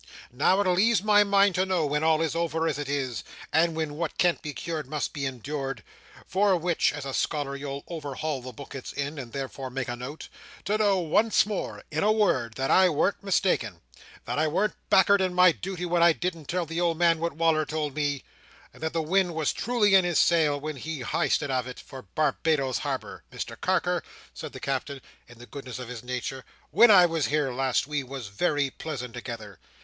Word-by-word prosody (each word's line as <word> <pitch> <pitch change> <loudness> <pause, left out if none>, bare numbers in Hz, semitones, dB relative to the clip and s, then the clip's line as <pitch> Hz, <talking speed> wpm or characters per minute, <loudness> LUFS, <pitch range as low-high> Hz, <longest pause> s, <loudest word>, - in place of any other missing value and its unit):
Now 145 +10 +3
it'll 185 -3 +2
ease 225 -1 +3
my 210 -1 +5
mind 200 -1 +4
to 185 - +2
know, 185 -4 0
when 150 +1 0
all 160 0 +3
is 160 - -1
over, 165 -1 0
as 150 -2 -1
it 145 -2 -4
is, 130 -5 -2 0.3
and 165 +1 +3
when 160 -2 -2
what 160 +1 -4
can't 175 -1 +2
be 150 - -5
cured 155 -1 -5
must 150 +1 -3
be 140 -3 -2
endoored—for 140 - -2
which, 170 0 +1
as 145 -2 -6
a 135 - -4
scholar, 140 -1 -1
you'll 140 0 -6
overhaul 150 -3 -4
the 130 +1 -8
book 140 +3 -11
it's 135 - -7
in, 145 +1 -4
and 120 -3 -7
thereof 135 0 -5
make 135 -1 -3
a 120 - -3
note—to 150 - -6
know 205 -2 +3
once 185 +7 +3
more, 210 -2 -4
in 155 +1 -1
a 210 - +4
word, 130 - +1
that 135 +2 -1
I 185 -1 +6
warn't 175 +6 0
mistaken; 175 - 0 0.4
that - - -2
I 155 - +3
warn't 195 +7 0 0.2
back'ard 195 +1 +5
in 185 -1 0
my 180 -1 +7
duty 180 +1 -5
when 175 0 +1
I 170 -1 +6
didn't 170 -2 -4
tell 175 +3 -1
the 165 +2 -3
old 170 -2 +1
man 170 -1 +3
what 170 -1 -2
Wal"r 160 0 +2
told 150 -2 -2
me; 145 -2 -1 0.5
and - - -17
that 160 0 -2
the 165 -1 0
wind 180 +1 +1
was 160 -2 0
truly 230 -5 +1
in 190 -1 +7
his 175 -3 0
sail, 155 -4 +3
when 155 0 -5
he 155 +1 -5
highsted 140 +3 0
of 130 -1 -1
it 125 - -8
for 130 - -10
Barbados 150 -4 +1
Harbour. - - -4
Mr - - -6
Carker," - - 0 0.3
said - - -7
the - - -9
Captain, 135 +1 -3 0.3
in 120 - -15
the 120 - -12
goodness 130 -2 -8
of 125 -2 -7
his 125 -2 -7
nature, 125 +1 -4 0.3
"when 220 +9 +7
I 185 -4 +8
was 165 -3 0
here 150 -2 0
last, 130 0 +1
we 145 0 -2
was 130 -4 -7
very 145 - 0
pleasant 125 -7 -6
together. 115 -6 -8
155 Hz, 210 wpm, -27 LUFS, 135-175 Hz, 0.5 s, I